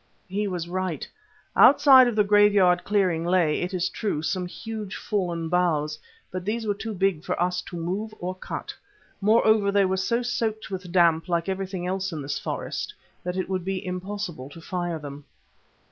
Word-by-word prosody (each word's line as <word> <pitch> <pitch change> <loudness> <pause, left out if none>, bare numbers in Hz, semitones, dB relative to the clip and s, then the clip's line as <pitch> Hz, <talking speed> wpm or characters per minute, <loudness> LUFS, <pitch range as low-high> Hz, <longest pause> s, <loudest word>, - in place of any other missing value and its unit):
He 205 +3 -1
was 175 -3 -3
right. 180 -4 -3 0.5
Outside 265 -2 +8
of 240 - -1
the 210 - +4
graveyard 200 -3 +4
clearing 185 -5 +1
lay, 170 -3 +2
it 180 - -2
is 185 -1 0
true, 200 -9 -2
some 180 +3 -1
huge 215 +1 -6
fallen 175 -6 -2
boughs. 155 -3 +1 0.3
But 185 0 -4
these 220 +4 -2
were 205 - +1
too 220 +1 -6
big 190 -4 +1
for - - -2
us 180 +1 +1
to 180 - -8
move 190 +6 -3
or 180 +1 -4
cut. 185 - -6 0.5
Moreover, 215 -1 +4
they 200 -1 +4
were 190 0 0
so 235 +6 0
soaked 225 -3 -2
with 185 -2 -5
damp, 170 -2 +3
like 170 0 0
everything 190 -1 -3
in 185 +2 -1 0.2
this 140 0 -3
forest, - - -4 0.3
that 180 +1 -3
it 185 - -1
would 185 -2 -2
be 190 0 -3
impossible 180 -6 -5
to 155 - -12
fire 175 0 -3
them. 145 -1 -9
185 Hz, 175 wpm, -25 LUFS, 175-205 Hz, 0.5 s, Outside